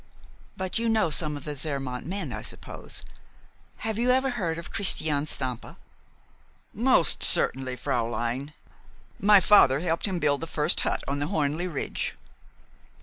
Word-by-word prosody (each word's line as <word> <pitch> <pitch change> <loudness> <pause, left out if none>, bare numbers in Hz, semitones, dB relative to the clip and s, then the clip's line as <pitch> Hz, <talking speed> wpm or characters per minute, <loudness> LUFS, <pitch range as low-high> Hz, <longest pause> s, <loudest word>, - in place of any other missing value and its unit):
"But 185 +3 -3
you 230 0 0
know 220 -7 +1
some 150 -1 +1
of 140 - -11
the 150 -1 -5
Zermatt 135 -3 -2
men, 195 +4 -5
I - - -5
suppose? - - -5 0.8
Have 220 0 -2
you 245 +1 +1
ever 260 +1 +2
heard 175 -9 -2
of 170 - -8
Christian 155 -6 +3
Stampa?" 130 -5 -4 1.0
"Most - - +3
certainly, 130 -1 +2
fräulein. 120 +4 -2 0.7
My 205 0 +6
father 160 -8 +5
helped 170 +2 -1
him 190 - -3
to - - -2
build 145 -2 +1
the 165 - -5
first 155 +1 +1
hut - - -1
on 140 +1 -2
the 145 - -2
Hörnli 155 +4 -1
Ridge." 140 - -3
155 Hz, 150 wpm, -26 LUFS, 140-190 Hz, 1.0 s, My